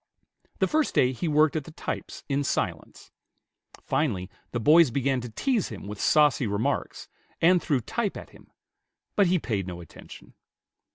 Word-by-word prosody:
The - - +2
first 310 -1 0
day 125 - +4
he 150 +7 -3
worked 155 0 +3
at 155 -3 -2
the - - -10
types - - -6
in 140 0 0
silence. - - -3 0.7
Finally 100 -12 -1 0.2
the 120 - -3
boys 155 +5 +6
began 135 +1 0
to 120 - -7
tease 235 - 0
him 105 -4 -9
with 105 0 -7
saucy 150 -5 +3
remarks, 100 +2 -2 0.3
and 175 +1 +4
threw 140 -5 0
type 225 - -2
at - - -10
him; - - -18 0.7
but 200 -3 +4
he 180 +1 +3
paid 105 - -3
no 90 -1 -6
attention. 85 - -13
140 Hz, 165 wpm, -26 LUFS, 110-165 Hz, 0.7 s, boys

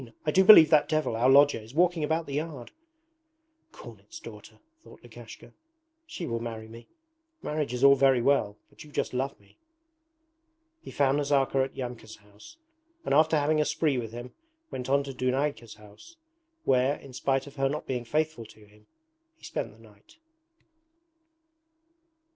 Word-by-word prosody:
I 150 - +1
do 190 +4 +4
believe 175 -6 +9
that 150 -2 +4
devil, 155 -7 -1
our 120 +3 +2
lodger, 140 -1 +5
is 110 +5 -14
walking 175 -1 +2
about 160 +2 -1
the 140 - -8
yard.' 150 -4 -5 1.0
'Cornet's 335 -8 -13
daughter,' - - -13 0.3
thought - - -17
Lukashka. - - -13 0.5
'She 185 - -7
will 115 -4 -3
marry 115 -1 -7
me. 115 +1 -13 0.6
Marriage 150 -4 -3
is 125 +1 -4
all 140 0 +8
very 135 -2 +3
well, 115 -5 +1
but - - -14
you 150 - -16
just - - -3
love 135 +2 -3
me!' - - -27 1.2
He - - -11
found 140 0 +1
Nazarka 140 -2 +1
at 135 - -12
Yamka's 120 -3 -7
house, 105 - -18 0.5
and - - -1
after 155 +2 +4
having 150 +1 +1
a - - 0
spree 145 -5 0
with 115 -2 -6
him 120 +2 -9 0.4
went 125 -1 -6
to - - -3 0.2
Dunayka's 130 -2 -2
house, 105 - -17 0.5
where, 130 +2 +2
in 135 -3 -14
spite 135 +1 -1
of 140 0 -14
her 135 0 +1
not 150 +2 -5
being 125 -2 -3
faithful 150 -2 -2
to 110 0 -18
him, 105 +1 -24 0.5
he - - -31
spent 115 - -5
the 105 - -20
night. 110 - -21
135 Hz, 165 wpm, -27 LUFS, 115-150 Hz, 1.2 s, believe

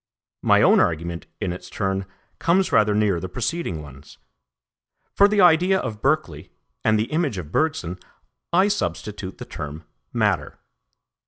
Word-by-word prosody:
My - - +4
own - - +6
argument 85 +1 -1
in 90 -4 -2
its 90 0 -10
turn 95 -1 -2 0.3
comes 185 +3 +2
rather 105 -1 +4
near 105 -4 +2
the 95 - -6
preceding 110 - -3
ones. 70 0 -14 1.0
For 200 - +6
the 205 -1 +2
idea 180 +2 +5
of 105 - -5
Berkeley, 135 - -1 0.3
and 110 - +3
the 110 +2 -2
image 155 - 0
of 80 -4 -7
Bergson, 95 - -1 0.5
I 185 +3 +4
substitute 95 - -3
the - - -8
term 75 +2 -7 0.3
matter. - - 0
105 Hz, 145 wpm, -23 LUFS, -, 1.0 s, own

